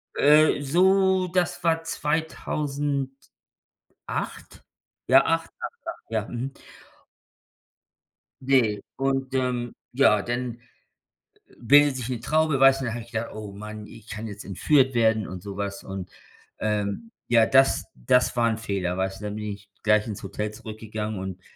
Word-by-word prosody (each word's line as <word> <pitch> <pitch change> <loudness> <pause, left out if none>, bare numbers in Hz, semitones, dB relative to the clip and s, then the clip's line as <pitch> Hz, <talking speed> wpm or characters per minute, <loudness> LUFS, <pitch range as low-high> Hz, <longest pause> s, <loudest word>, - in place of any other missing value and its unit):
Äh, 150 0 +5
so 190 +5 +3
das 175 -3 -1
war 165 -1 +2
2008. 145 -3 -3 1.7
Ja, - - +6
8, - - 0
8, - - -6
8, - - -7
ja. 110 -2 -1
Mhm. 125 +3 -4 1.9
Ne, 130 -6 +3 0.2
und, 135 -1 -1
ähm 125 -2 -1 0.2
ja, 105 -7 +5
dann, 120 +1 -3 0.9
äh, - - -23
bildet 140 +2 +5
sich 125 0 -4
'ne 125 -3 -2
Traube, 155 -3 +2
weißt 135 0 +6
du, - - -2
dann 115 - -2
habe 120 -1 -5
ich 115 - -18
gedacht: 115 +1 -3
„Oh 105 -2 -7
Mann, 105 +1 -8
ich 110 -1 -14
kann 110 +1 -5
jetzt 100 -2 -9
entführt 130 - +3
werden 110 -2 +2
und 90 -1 -7
sowas“, 100 0 -5
und, 95 -1 -6 0.5
ähm, 105 - -2 0.2
ja, 115 -2 +5
das 135 +2 +4
das 125 - +2
war 115 -1 +4
'n 110 - -1
Fehler, 95 -5 -2
weißt 95 0 -2
du, - - -6
dann 105 0 -4
bin 105 0 -5
ich 100 0 -14
gleich 105 0 +3
ins 105 - -6
Hotel 105 0 -4
zurückgegangen 110 -2 -6
und 95 -1 -6
115 Hz, 150 wpm, -25 LUFS, 105-135 Hz, 1.9 s, Ja